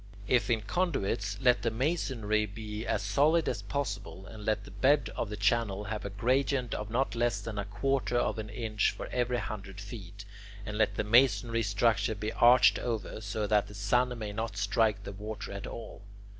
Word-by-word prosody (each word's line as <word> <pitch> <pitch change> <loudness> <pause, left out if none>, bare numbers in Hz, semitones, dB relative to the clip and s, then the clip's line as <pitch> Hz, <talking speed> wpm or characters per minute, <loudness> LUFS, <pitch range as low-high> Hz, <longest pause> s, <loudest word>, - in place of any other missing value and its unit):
If 125 +2 +2
in 115 -2 +2
conduits, 100 - -1
let 125 -1 +4
the 115 - +1
masonry 115 -5 0
be 105 +1 -6
as - - 0
solid 155 +3 +3
as - - -1
possible, 100 -8 -4
and 110 +1 -10
let 105 -1 0
the - - -12
bed 140 +2 +2
of 110 - -2
the 105 - -5
channel 105 -1 +1
have 105 +1 -4
a 100 - -4
gradient 125 +4 0
of 105 0 -4
not 125 +4 0
less 120 -3 +1
than 105 0 -5
a 100 - -2
quarter 120 +5 0
of 120 - 0
an 105 0 -5
inch 110 -1 0
for - - -6
every 125 0 0
hundred 100 -4 -6
feet, 100 -1 -9 0.4
and 105 - -5
let 110 0 +2
the - - 0
masonry 115 0 +4
structure 110 +1 +1
be 105 +2 -4
arched 120 -5 +6
over, 110 -3 -3
so 105 +1 -2
that 105 -1 +2
the 105 - -11
sun 125 +5 +1
may 105 -2 -5
not 110 -1 -4
strike 100 0 +1
the 100 - -6
water 105 +2 -6
at 100 0 -6
all. 115 - -8
110 Hz, 195 wpm, -30 LUFS, 100-120 Hz, 0.4 s, arched